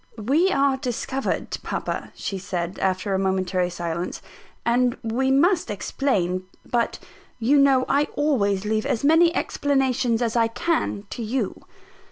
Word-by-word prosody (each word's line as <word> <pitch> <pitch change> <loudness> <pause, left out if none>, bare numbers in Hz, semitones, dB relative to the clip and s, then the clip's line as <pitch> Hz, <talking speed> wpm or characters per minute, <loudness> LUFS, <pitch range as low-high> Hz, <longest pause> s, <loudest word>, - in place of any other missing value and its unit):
"We 280 - +2
are 275 -4 +2
discovered, 265 +1 -2
papa," - - -4
she 195 - -4
said, 180 -1 -4
after 190 +1 0
a 190 - +1
momentary 185 -1 0
silence, 170 0 -4 0.5
"and 245 +1 +2
we 240 +4 0
must 325 +4 +3
explain: 185 -4 -1 0.2
but 235 -1 0 0.4
you 260 +5 +3
know 270 -2 +4
I 285 +2 +3
always 210 -10 +1
leave 215 0 0
as 230 - -1
many 325 +3 +5
explanations 260 -4 +1
as 230 -1 -1
I 230 -1 +4
can 230 -4 -1
to - - -5
you." 230 -2 -3
235 Hz, 140 wpm, -24 LUFS, 195-275 Hz, 0.5 s, many